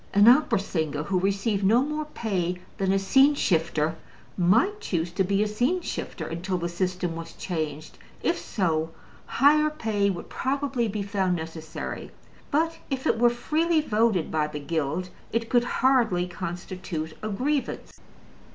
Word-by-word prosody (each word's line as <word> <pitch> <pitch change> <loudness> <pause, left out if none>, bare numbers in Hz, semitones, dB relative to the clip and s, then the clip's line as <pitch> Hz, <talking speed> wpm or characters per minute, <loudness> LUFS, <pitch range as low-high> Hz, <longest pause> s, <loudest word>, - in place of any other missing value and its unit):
An 205 +2 +7
opera 265 +6 +6
singer 160 -6 -2
who 185 +2 0
received 200 +2 0
no 225 +6 +5
more 300 +1 -3
pay 190 - -2 0.2
than 190 -1 +2
a 195 - +3
scene 270 +9 +5
shifter 160 - +1 0.4
might 230 - +3
choose 170 - -2
to 190 - +1
be 200 +2 +2
a - - 0
scene 245 +12 +1
shifter - - -5
until 180 +3 -3
the 170 0 -2
system 180 -1 -2
was 165 0 -7
changed: 155 -4 -4 0.2
if 340 - +1
so, 160 -6 -1 0.4
higher 300 +3 +4
pay 220 -9 0
would 175 -3 -4
probably 265 -3 -1
be 210 -1 -3
found 195 -3 0
necessary. 160 -1 -6 0.4
But 325 +3 +1
if 265 -2 -3
it - - +2
were 240 0 +6
freely 310 +7 +1
voted 215 - +1
by 155 -1 +1
the 150 -1 -6
Guild, 160 +4 -2 0.2
it 230 0 -1
could 240 -1 +4 0.2
hardly 230 -10 +4
constitute 175 -2 -5
a 215 - -3
grievance. 270 +7 -2
195 Hz, 155 wpm, -26 LUFS, 170-245 Hz, 0.4 s, An